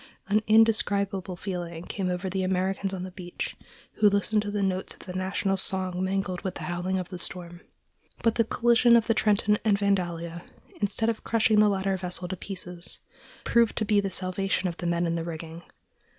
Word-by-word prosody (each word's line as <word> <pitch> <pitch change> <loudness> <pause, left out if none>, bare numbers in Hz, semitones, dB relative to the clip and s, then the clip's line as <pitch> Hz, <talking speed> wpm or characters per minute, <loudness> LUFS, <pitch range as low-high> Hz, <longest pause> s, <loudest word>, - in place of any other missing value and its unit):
An 210 +2 +3
indescribable 200 -4 +3
feeling 175 -3 -5
came 190 -1 -3
over 180 +1 -2
the 190 +1 -1
Americans 190 +1 0
on 185 -2 -4
the 185 - -6
beach 180 -1 -6 0.4
who 210 -1 +6
listened 200 +1 +1
to 205 - -4
the 205 -1 -1
notes 190 -1 -2
of - - -16
the 180 - -8
national 190 +1 0
song 185 -2 -1
mingled 190 -1 -1
with 185 -1 -4
the - - -6
howling 180 +2 -1
of 185 -2 -4
the 180 - -7
storm. 175 -1 -4 0.6
But 230 - +4
the 230 - +3
collision 235 +1 +4
of 230 - +2
the 230 - +3
Trenton 210 -1 +2
and 210 -3 +3
Vandalia, 175 -4 -1 0.4
instead 215 +2 +1
of 225 - -3
crushing 220 -2 +3
the 210 0 +6
latter 195 -1 0
vessel 180 0 -2
to 190 - -2
pieces, 180 -2 -6 0.4
proved 235 -1 +3
to 215 - +1
be 210 -1 +3
the 195 - -2
salvation 190 0 -1
of 170 -1 -4
the 175 - -3
men 170 0 +1
in 165 - 0
the 165 -1 -2
rigging. 165 0 -6
190 Hz, 195 wpm, -27 LUFS, 180-205 Hz, 0.6 s, who